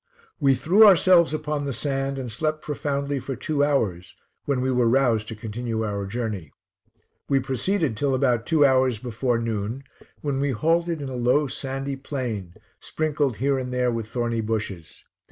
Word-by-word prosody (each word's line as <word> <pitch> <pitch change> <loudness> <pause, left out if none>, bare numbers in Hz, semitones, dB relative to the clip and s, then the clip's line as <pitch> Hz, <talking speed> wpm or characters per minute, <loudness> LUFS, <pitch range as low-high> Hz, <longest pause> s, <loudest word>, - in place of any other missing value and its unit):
We 135 -3 +4
threw 180 - +5
ourselves 180 -3 +6
upon 150 -1 -2
the 140 - -2
sand, 135 +2 -2
and 125 -3 -4
slept 155 +6 -2
profoundly 140 -1 -2
for 135 +1 -5
two 150 0 0
hours, 100 -12 0 0.3
when 140 -3 0
we 130 +1 0
were 125 -2 +2
roused 120 -4 +2
to 110 - -6
continue 110 +1 -4
our 100 -2 -3
journey. 105 - -4 0.8
We 135 -1 +3
proceeded 135 - -1
till 135 +4 0
about 125 -3 +1
two 155 -3 +4
hours 130 -3 +3
before 120 +1 -1
noon, 115 +2 -3 0.4
when 140 -2 -1
we 140 +1 +1
halted 165 +4 0
in 135 - -5
a 130 - -5
low 125 +5 +2
sandy 135 +1 -4
plain, 120 - -5 0.2
sprinkled 150 -5 -1
here 135 +5 0
and 125 -1 -4
there 125 -1 +1
with 115 -2 -3
thorny 115 -1 -1
bushes. 105 -7 -4
130 Hz, 170 wpm, -24 LUFS, 115-145 Hz, 0.8 s, ourselves